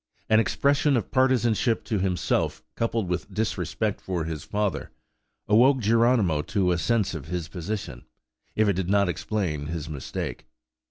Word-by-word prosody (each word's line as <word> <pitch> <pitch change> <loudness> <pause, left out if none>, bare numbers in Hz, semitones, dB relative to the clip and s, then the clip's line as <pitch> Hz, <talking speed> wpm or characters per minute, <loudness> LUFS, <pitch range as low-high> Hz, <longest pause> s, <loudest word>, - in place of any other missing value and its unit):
An 110 - +6
expression 140 +4 +2
of 110 - -3
partizanship 120 -3 +2
to 105 - -1
himself, 90 -4 0
coupled 115 -3 -1
with 90 -1 -3
disrespect 110 -1 -2
for 90 -3 -2
his 80 -2 -5
father, 105 -2 -2 0.6
awoke 125 +6 +5
Geronimo 115 -7 +3
to 95 +2 0
a 85 - +1
sense 110 +2 +1
of 80 -4 -6
his 85 -1 -3
position, 90 - -5 0.5
if 110 0 +3
it 100 - +3
did 95 0 -2
not 100 -1 +3
explain 85 -7 -2
his 80 -1 -4
mistake. 75 -3 -5
100 Hz, 150 wpm, -26 LUFS, 85-115 Hz, 0.6 s, An